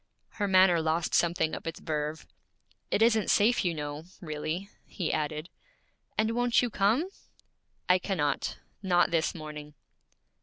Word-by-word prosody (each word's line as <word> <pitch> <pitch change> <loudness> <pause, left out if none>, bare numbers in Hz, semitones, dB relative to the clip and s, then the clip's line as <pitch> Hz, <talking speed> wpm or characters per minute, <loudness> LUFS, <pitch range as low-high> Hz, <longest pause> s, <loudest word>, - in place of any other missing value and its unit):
Her 205 -2 -2
manner 185 -3 +5
lost 160 +1 0
something 170 -2 +2
of - - -6
its 165 - -4
verve. 155 0 -3 0.6
'It 220 - +3
isn't 225 -2 +3
safe, 230 +4 +4
you 175 -3 0
know, 150 +1 -5
really,' 155 +3 -4 0.2
he 175 -5 -3
added. 155 +1 -2 0.7
'And 220 +1 +2
won't 245 +1 +2
you 240 - -1
come?' 220 - +2 0.8
'I 180 0 +5
cannot; 180 -6 -1 0.2
not 180 -3 +3
this 165 0 +1
morning.' 150 -2 -8
170 Hz, 140 wpm, -29 LUFS, 155-205 Hz, 0.8 s, manner